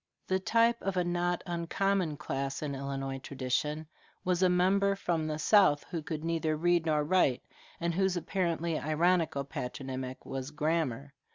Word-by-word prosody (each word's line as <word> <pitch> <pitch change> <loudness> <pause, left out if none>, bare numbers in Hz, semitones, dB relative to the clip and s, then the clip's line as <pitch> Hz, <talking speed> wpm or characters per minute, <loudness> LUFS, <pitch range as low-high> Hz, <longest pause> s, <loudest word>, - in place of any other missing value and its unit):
The 190 0 +1
type 230 +4 +3
of 195 -1 -2
a 180 - +3
not 175 0 0
uncommon 175 -1 0
class 135 -1 -3
in 145 -2 -2
Illinois 135 0 -4
tradition 140 +4 -2 0.4
was 180 0 +1
a 185 - +5
member 195 +2 +3
from 170 -5 -1
the 155 -1 -2
South 155 -3 +4
who 170 -3 -2
could 155 0 -5
neither 165 -2 0
read 175 0 +2
nor 150 -1 +2
write, 150 -6 +2 0.4
and 170 0 0
whose 190 0 +1
apparently 170 -2 -1
ironical 160 -1 +1
patronymic 130 -1 -5
was 135 0 -4
Grammar. 150 -3 -1
160 Hz, 155 wpm, -31 LUFS, 140-180 Hz, 0.4 s, a